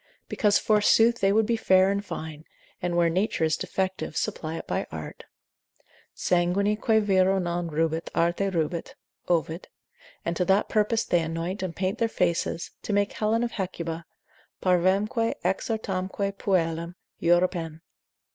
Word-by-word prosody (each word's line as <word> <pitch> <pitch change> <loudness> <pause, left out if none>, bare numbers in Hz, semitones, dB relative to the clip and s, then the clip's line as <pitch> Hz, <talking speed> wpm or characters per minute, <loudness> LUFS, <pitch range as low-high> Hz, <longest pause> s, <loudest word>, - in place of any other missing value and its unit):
Because 205 -2 +2
forsooth 225 +2 +4
they 195 0 +3
would 220 +2 +3
be 230 +2 +1
fair 190 -3 +4
and 200 0 -1
fine, 155 -5 -7 0.4
and 175 -1 -1
where 170 -1 +4
nature, 180 +1 0
is 155 -1 +2
defective, 190 -4 -3
supply 160 0 -2
it - - -7
by - - -2
art. - - -8 0.9
Sanguine 185 +4 +1
quae 220 0 +3
vero 195 -2 +3
non 175 -1 -2
rubet, 160 +1 -1
arte 175 +4 +1
rubet, 170 -2 -2 0.3
(Ovid); 165 0 -1 0.6
and 170 - -1
to 180 - +1
that 195 +3 +2
purpose 220 +1 +2
they 175 - +2
anoint 165 +4 -3
and 185 -3 -4
paint 190 +1 -2
their 230 - +2
faces, 170 -3 -1
to 210 - -3
make 205 0 +1
Helen 225 +2 +1
of 240 - -2
Hecuba—parvamque 185 +4 -2
exortamque 195 -2 -1
puellam—Europen. 170 -1 0
185 Hz, 135 wpm, -26 LUFS, 170-205 Hz, 0.9 s, forsooth